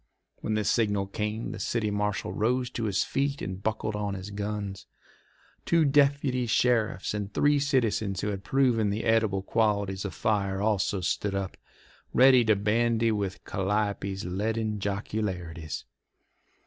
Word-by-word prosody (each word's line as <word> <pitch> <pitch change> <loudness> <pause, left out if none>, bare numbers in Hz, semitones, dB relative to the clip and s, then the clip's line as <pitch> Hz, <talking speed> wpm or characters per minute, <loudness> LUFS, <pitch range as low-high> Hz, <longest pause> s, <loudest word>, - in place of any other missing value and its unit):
When 110 - -2
the 105 - +1
signal 105 -1 +1
came 105 +3 -3
the - - -7
city 110 -3 -1
marshal 105 0 -1
rose 125 +3 0
to 115 - -3
his 100 -5 +1
feet 140 +1 -1
and 95 0 -5
buckled 110 0 -2
on 100 -1 -2
his 95 +2 -7
guns. 100 -1 -4 0.8
Two 165 -2 +3
deputy 140 -3 +2
sheriffs 110 -5 +1
and 105 -1 -3
three 145 +6 +3
citizens 115 -8 +1
who 105 - -1
had 100 -1 -4
proven 125 -7 +2
the 105 +2 -2
edible 110 -4 +2
qualities 100 -3 0
of 100 - -5
fire 100 -3 0
also 100 -2 +1
stood 100 +3 -1
up, 100 -2 -3 0.6
ready 130 -1 +7
to 110 -1 +4
bandy 115 +2 +2
with 100 -2 -3
Calliope's 100 0 -1
leaden 105 +3 -1
jocularities. 90 -6 -3
105 Hz, 145 wpm, -28 LUFS, 100-115 Hz, 0.8 s, ready